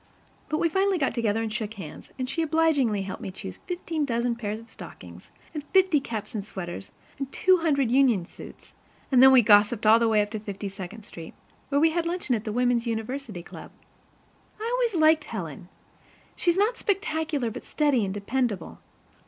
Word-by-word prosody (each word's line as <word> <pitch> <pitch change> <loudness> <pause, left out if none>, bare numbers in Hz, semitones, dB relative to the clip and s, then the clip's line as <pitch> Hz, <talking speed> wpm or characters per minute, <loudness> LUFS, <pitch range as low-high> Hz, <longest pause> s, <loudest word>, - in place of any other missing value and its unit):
But 310 - 0
we 335 - +2
finally 385 +3 +1
got 275 -5 0
together 225 -2 0
and 220 -1 -3
shook 220 -1 -4
hands, 195 - -9
and 255 -1 -2
she 300 +6 -2
obligingly 295 -10 +2
helped 190 - -6
me - - -5
choose 95 - -8
fifteen 335 -3 -2
dozen 235 -2 0
pairs 215 -2 -4
of 230 - -15
stockings - - -12 0.2
and 300 -2 -4
fifty 375 -5 +5
caps 220 -5 -6
and 210 -3 -3
sweaters 175 - -7 0.3
and 275 -1 -4
two 370 +5 +4
hundred 280 -7 +1
union 250 -9 +4
suits, - - -13 0.4
and 255 -2 +6
then 265 0 +9
we 255 -2 +7
gossiped 210 +1 +4
all 220 +2 +7
the 230 - +2
way 215 -2 +3
up 205 - -8
to 220 - -3
Fifty 205 -1 -6
second 195 +2 -8
Street, 165 -5 -10 0.3
where 285 0 +2
we 320 +2 +4
had 335 0 -1
luncheon 345 -6 -1
at 225 -1 -2
the 215 - -2
Women's 245 0 +1
University 225 -3 -4
Club. - - -11 0.9
I 440 - -3
always 485 -5 +1
liked 315 0 +4
Helen. - - -7 0.7
She's 345 0 +1
not 435 +4 +2
spectacular, 315 - -1
but 250 - -8
steady 290 -7 +2
and 195 - -2
dependable. 205 -2 -2
245 Hz, 190 wpm, -26 LUFS, 215-315 Hz, 0.9 s, then